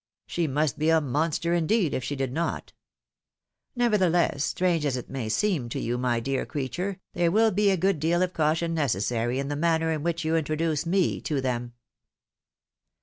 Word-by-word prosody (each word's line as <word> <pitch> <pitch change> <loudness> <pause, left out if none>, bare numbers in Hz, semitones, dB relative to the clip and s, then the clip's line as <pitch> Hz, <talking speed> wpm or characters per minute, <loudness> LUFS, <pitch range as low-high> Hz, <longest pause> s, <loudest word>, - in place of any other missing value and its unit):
She 170 -2 -1
must 150 +1 0
be 155 +1 +2
a 160 0 +5
monster, 160 +4 0
indeed, 175 0 +1
if 130 - -2
she 145 - -3
did 135 -2 -2
not! 165 +3 -3 1.0
Nevertheless, 185 - +2
strange 175 -4 0
as 140 -3 0
it 125 - -8
may 130 -5 -3
seem 140 - 0
to - - -3
you, 120 +1 -2
my 125 -2 +1
dear 135 +3 -1
creature, 175 +8 -4
there 175 -1 +2
will 220 +4 +4
be 205 +1 +3
a 190 - +2
good 190 -1 +1
deal 170 +4 +2
of 185 0 -2
caution 165 +2 +1
necessary 120 - 0
in 135 +1 -2
the 145 - -2
manner 160 +1 +1
in 155 -2 -2
which 170 0 -2
you 160 +1 +1
introduce 155 0 0
me 185 +1 +1
to 145 -3 -1
them." 120 -2 -2
160 Hz, 185 wpm, -26 LUFS, 135-175 Hz, 1.0 s, a